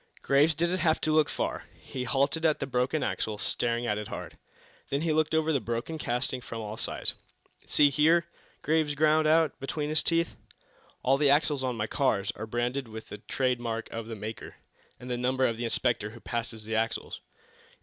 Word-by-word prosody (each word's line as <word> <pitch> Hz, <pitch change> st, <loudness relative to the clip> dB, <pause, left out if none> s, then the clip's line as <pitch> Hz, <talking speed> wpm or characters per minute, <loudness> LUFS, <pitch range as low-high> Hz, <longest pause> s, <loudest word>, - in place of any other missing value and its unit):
Graves 145 Hz, +3 st, +4 dB
didn't 170 Hz, +4 st, 0 dB
have 160 Hz, -1 st, +2 dB
to 155 Hz, -, +1 dB
look 155 Hz, 0 st, +4 dB
far. -, -, -3 dB
He 125 Hz, -1 st, -5 dB
halted 140 Hz, +6 st, +1 dB
at 155 Hz, -2 st, +3 dB
the -, -, -1 dB
broken 130 Hz, +3 st, 0 dB
axle, 110 Hz, -1 st, -2 dB
staring 120 Hz, +2 st, -1 dB
at 105 Hz, -2 st, 0 dB
it 105 Hz, -, -5 dB
hard. -, -, -7 dB, 0.5 s
Then 140 Hz, +1 st, 0 dB
he 160 Hz, -1 st, +1 dB
looked 155 Hz, 0 st, +2 dB
over 160 Hz, 0 st, +2 dB
the 140 Hz, -, +3 dB
broken 120 Hz, +8 st, -3 dB
casting 125 Hz, 0 st, -1 dB
from 115 Hz, -2 st, -6 dB
all 105 Hz, -1 st, -5 dB
sides. -, -, -2 dB, 0.5 s
"See 145 Hz, -1 st, +5 dB
here," 160 Hz, +4 st, +4 dB, 0.4 s
Graves 155 Hz, -1 st, +2 dB
ground 155 Hz, +1 st, +4 dB
out, 160 Hz, 0 st, +3 dB
between 145 Hz, +2 st, -3 dB
his 155 Hz, 0 st, +3 dB
teeth, 165 Hz, 0 st, +1 dB, 0.7 s
"all 135 Hz, +2 st, +3 dB
the 145 Hz, -2 st, +4 dB
axles 145 Hz, -1 st, +3 dB
on 125 Hz, -2 st, -1 dB
my 105 Hz, -, 0 dB
cars 110 Hz, -5 st, +1 dB
are 110 Hz, -, -7 dB
branded 120 Hz, +3 st, -1 dB
with 110 Hz, 0 st, -9 dB
the 105 Hz, -, -7 dB
trade 125 Hz, +2 st, 0 dB
mark 115 Hz, -1 st, -4 dB
of 115 Hz, -1 st, -5 dB
the 115 Hz, -, -5 dB
maker, 110 Hz, +1 st, -7 dB, 0.4 s
and 125 Hz, -, -10 dB
the 125 Hz, -1 st, -2 dB
number 130 Hz, +1 st, +1 dB
of 115 Hz, -2 st, 0 dB
the 120 Hz, -, -2 dB
inspector 115 Hz, -2 st, +1 dB
who 115 Hz, +2 st, -12 dB
passes 115 Hz, -2 st, -4 dB
the 110 Hz, +1 st, -5 dB
axles. 115 Hz, +1 st, -1 dB
130 Hz, 200 wpm, -29 LUFS, 115-155 Hz, 0.7 s, See